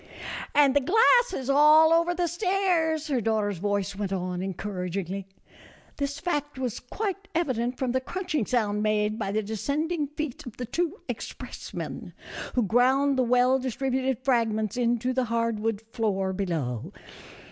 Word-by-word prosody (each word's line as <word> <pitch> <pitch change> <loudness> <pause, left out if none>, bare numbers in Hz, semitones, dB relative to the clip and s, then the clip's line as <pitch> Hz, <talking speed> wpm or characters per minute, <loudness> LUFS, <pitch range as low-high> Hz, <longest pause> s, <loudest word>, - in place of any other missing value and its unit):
" - - -5
And 285 -2 +5
the - - +6
glass 460 - +5
is 265 -8 -4
all 305 +3 +6
over 335 +1 +3
the 350 0 +1
stairs," 345 -3 +1
her 265 -5 0
daugh 220 0 +1
ter's 205 -4 -2
voice 200 0 -1
went 200 -1 -3
on, 180 -1 -2
encouragingly. 190 0 -4 0.7
This 280 0 -2
fact 295 -5 -2
was 255 -4 -3
quite 395 - -4
evident 250 -7 0
from 260 -2 -1
the 260 +1 0
crunching 330 - -2
sound 210 -4 +1
made 215 +1 +1
by 195 -3 -2
the 215 +1 0
descending 290 - -1
feet 300 -2 -5
of 235 - -9
the 245 - -4
two 340 - -2
expressmen, - - -6 0.4
who 245 - +3
ground 260 +6 +3
the 260 - +2
well 250 +2 +3
distributed 260 0 -1
fragments 220 -5 +1
into 240 +1 +1
the 255 0 +1
hard 230 -1 0
wood 220 0 -2
floor 195 -5 0
below. 160 - -2
250 Hz, 160 wpm, -27 LUFS, 210-295 Hz, 0.7 s, the